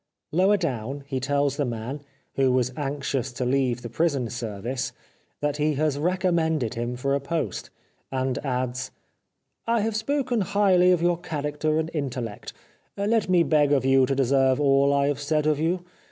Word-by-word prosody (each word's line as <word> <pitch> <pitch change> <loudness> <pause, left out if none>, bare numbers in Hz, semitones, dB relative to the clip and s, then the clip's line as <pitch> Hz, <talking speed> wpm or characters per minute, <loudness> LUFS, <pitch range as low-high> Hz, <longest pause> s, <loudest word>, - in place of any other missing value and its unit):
Lower 190 +5 +4
down 135 - -3
he 135 -2 -3
tells 140 +1 0
the 145 - +1
man 120 +4 -4 0.2
— - - -42
who 135 -1 +3
was 125 0 +1
anxious 140 -2 -2
to 125 +1 -3
leave 125 -2 +1
the - - -4
prison 140 -3 0
service, 120 +2 -4 0.5
that 145 0 0
he 150 0 +1
has 145 -1 0
recommended 165 - +1
him 120 +1 -3
for 140 +3 -1
a 140 - +2
post, 155 +3 -3 0.4
and 130 -1 -1
adds: 130 -1 -2 0.4
" - - -55 0.3
I 230 -1 +2
have 220 0 -1
spoken 250 0 0
highly 190 -2 +4
of 175 -2 +2
your 175 -1 +2
character 155 -2 -2
and 160 +1 -1
intellect. 125 -8 -4 0.5
Let 210 +1 +1
me 180 -2 +5
beg 150 -3 +3
of 135 -3 +2
you 135 -1 +4
to 135 - 0
deserve 135 0 +3
all 140 -1 +4
I 140 0 +2
have 145 -1 -1
said 150 +1 0
of 155 -1 +2
you. 175 +3 0
140 Hz, 180 wpm, -25 LUFS, 130-165 Hz, 0.5 s, me